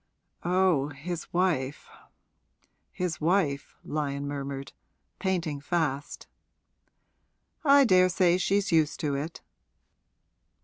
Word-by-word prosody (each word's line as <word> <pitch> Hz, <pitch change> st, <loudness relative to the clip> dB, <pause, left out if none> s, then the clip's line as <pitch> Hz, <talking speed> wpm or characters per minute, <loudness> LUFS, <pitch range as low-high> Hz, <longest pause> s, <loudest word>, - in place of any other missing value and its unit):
'Oh, 180 Hz, -5 st, +2 dB
his 155 Hz, +4 st, -6 dB
wife 165 Hz, -7 st, 0 dB, 1.0 s
his 180 Hz, -3 st, -3 dB
wife!' 160 Hz, -4 st, +1 dB
Lyon 145 Hz, -2 st, -3 dB
murmured, 140 Hz, -1 st, -5 dB, 0.5 s
painting 170 Hz, -7 st, -1 dB
fast. 145 Hz, -3 st, -2 dB, 1.4 s
'I 280 Hz, -1 st, +7 dB
daresay 185 Hz, -3 st, +4 dB
she's 200 Hz, +1 st, +1 dB
used 160 Hz, -2 st, +2 dB
to 145 Hz, -2 st, 0 dB
it.' 150 Hz, +4 st, -4 dB
160 Hz, 85 wpm, -28 LUFS, 140-185 Hz, 1.4 s, I